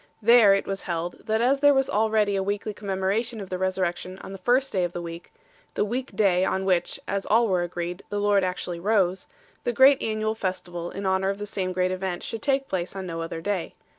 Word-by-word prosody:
There 220 -2 +7
it 195 - -1
was 195 0 -3
held, 175 +3 -4
that 220 +1 +1
as 265 +3 +3
there 290 0 +5
was 270 0 +2
already 215 -1 +2
a 195 - +1
weekly 205 +2 -2
commemoration 205 +4 -2
of 195 -2 -8
the 185 - -1
Resur 185 0 0
rection 180 +1 -3
on - - -8
the 195 - -8
first 255 +7 +2
day 185 -2 +1
of 175 0 -2
the 175 - -4
week 170 0 -8 0.4
the - - +1
week 250 +5 -4
day 185 -4 +3
on 190 0 0
which, 180 -2 0
as 200 0 -2
all 230 +2 +4
were 185 -3 +1
agreed, 175 +1 -4
the 205 - -2
Lord 205 -1 +3
actually 180 -1 -3
rose 190 -1 +1 0.4
the - - 0
great 265 +3 +6
annual 215 0 -1
festival 180 -4 -4
in 195 +2 -6
honour 190 0 +1
of 195 - -2
the 205 - -5
same 190 -3 -3
great 185 0 0
event 185 -1 -3
should 225 - -5
take 275 -1 +1
place 180 0 -3
on 190 -1 -5
no 165 -2 -4
other 165 0 -5
day. 195 -1 -3
195 Hz, 230 wpm, -25 LUFS, 185-215 Hz, 0.4 s, There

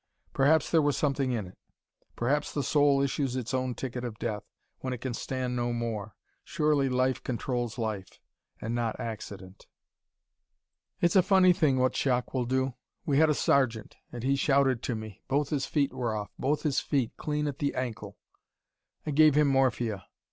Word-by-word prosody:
Perhaps 145 +3 +3
there 165 - +5
was 145 -2 +1
something 140 -3 0
in 115 -5 -2
it. 90 - -14 0.6
Perhaps 145 +5 0
the 145 - 0
soul 145 -2 +3
issues 135 -1 -1
its 125 0 -3
own 130 -1 -1
ticket 125 -1 -5
of 115 -3 -5
death, 110 -3 -3 0.4
when 130 -1 -3
it - - -4
can 130 0 -4
stand 125 +1 -3
no 120 0 -1
more. 115 -3 -4 0.3
Surely 150 -3 +1
life 130 0 +1
controls 120 -1 -2
life: 105 -5 -4 0.4
and 115 - -4
not 120 -2 -2
accident. 100 -5 -7 1.3
"It's 175 +1 +3
a 190 - +8
funny 185 -1 +5
thing 155 -7 +2
what 130 0 +2
shock 125 -2 0
will 130 -2 0
do. 130 +1 0 0.3
We 140 -1 +2
had 160 0 +5
a 150 - +2
sergeant 120 -8 +1 0.2
and 120 -1 -7
he 135 +1 +2
shouted 135 -3 +2
to 120 - -2
me. 110 -3 -8
Both 145 +1 0
his 145 -3 -1
feet 140 -4 0
were 120 -4 -2
off 105 -1 -5
both 145 +3 0
his 150 -4 +1
feet, 135 -6 0
clean 150 0 -2
at 145 -2 -3
the 140 -1 -1
ankle. 125 -3 -4 0.9
I 155 - -2
gave 155 0 +5
him 150 -1 +4
morphia. 120 -7 +1
130 Hz, 180 wpm, -29 LUFS, 120-145 Hz, 1.3 s, a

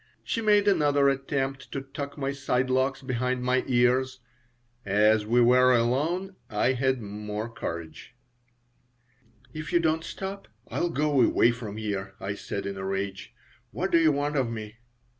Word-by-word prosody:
She 230 - -2
made 210 -2 +4
another 145 -7 +4
attempt 135 0 -2
to 135 - -2
tuck 140 +1 -7
my 135 -1 -1
side 130 -2 -1
locks 130 +1 +1
behind 125 0 -1
my 130 +1 +2
ears. 130 +1 +2 0.6
As 105 +1 +3
we 120 +2 +4
were 125 +1 +5
alone 160 +11 0
I 105 +4 +1
had 130 -1 0
more 105 +1 -5
courage 85 -7 -7 1.4
"If 155 +1 -6
you 175 - +4
don't 160 -1 +1
stop 195 +4 -6 0.2
I'll 175 - -1
go 150 -4 +2
away 120 0 +4
from 115 -3 -7
here," 100 -3 -4
I 100 +1 -3
said, 100 0 -5
in 100 0 -4
a 95 - -5
rage. 95 0 -4 0.3
"What 190 +1 -3
do 170 - +5
you 160 -2 +5
want 145 +1 -1
of 130 -4 +1
me?" 110 -1 -7
130 Hz, 160 wpm, -27 LUFS, 110-145 Hz, 1.4 s, were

